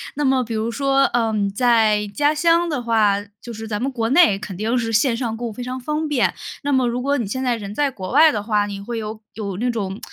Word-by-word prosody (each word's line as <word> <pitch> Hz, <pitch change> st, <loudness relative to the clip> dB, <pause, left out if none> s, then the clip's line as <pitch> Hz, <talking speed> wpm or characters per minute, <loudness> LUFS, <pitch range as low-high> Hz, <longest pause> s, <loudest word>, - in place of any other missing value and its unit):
那 295 Hz, +1 st, -1 dB
么 265 Hz, -1 st, +2 dB
比 230 Hz, -1 st, -5 dB
如 220 Hz, +2 st, -1 dB
说， 275 Hz, +2 st, +2 dB
呃， 230 Hz, -3 st, +1 dB, 0.2 s
在 220 Hz, -3 st, +3 dB
家 290 Hz, +9 st, +1 dB
乡 335 Hz, +2 st, +3 dB
的 295 Hz, -6 st, -2 dB
话， 220 Hz, -4 st, +2 dB, 0.2 s
就 240 Hz, -, -9 dB
是 220 Hz, 0 st, -7 dB
咱 210 Hz, -1 st, -3 dB
们 265 Hz, +3 st, -2 dB
国 230 Hz, -3 st, -2 dB
内 270 Hz, -, +5 dB
肯 190 Hz, -3 st, -7 dB
定 220 Hz, +4 st, -1 dB
是 230 Hz, -2 st, -1 dB
线 230 Hz, +3 st, +2 dB
上 230 Hz, -2 st, -3 dB
购 240 Hz, +1 st, -4 dB
物 225 Hz, -, -6 dB
非 245 Hz, -, -8 dB
常 255 Hz, +1 st, -5 dB
方 300 Hz, +4 st, -2 dB
便， 285 Hz, -5 st, +1 dB, 0.3 s
那 285 Hz, -, -1 dB
么 260 Hz, -2 st, +2 dB
如 240 Hz, +1 st, -1 dB
果 280 Hz, +3 st, 0 dB
你 230 Hz, -, -2 dB
现 260 Hz, +6 st, -3 dB
在 250 Hz, -2 st, +1 dB
人 205 Hz, -2 st, -7 dB
在 285 Hz, +1 st, +1 dB
国 190 Hz, -6 st, -7 dB
外 310 Hz, +3 st, +6 dB
的 210 Hz, -, -2 dB
话， 210 Hz, -1 st, +1 dB
你 200 Hz, -1 st, -6 dB
会 235 Hz, +3 st, -5 dB
有 215 Hz, 0 st, -6 dB
有 200 Hz, -4 st, -5 dB
那 245 Hz, +4 st, -1 dB
种 205 Hz, -4 st, -3 dB
235 Hz, 280 characters per minute, -21 LUFS, 215-265 Hz, 0.3 s, 外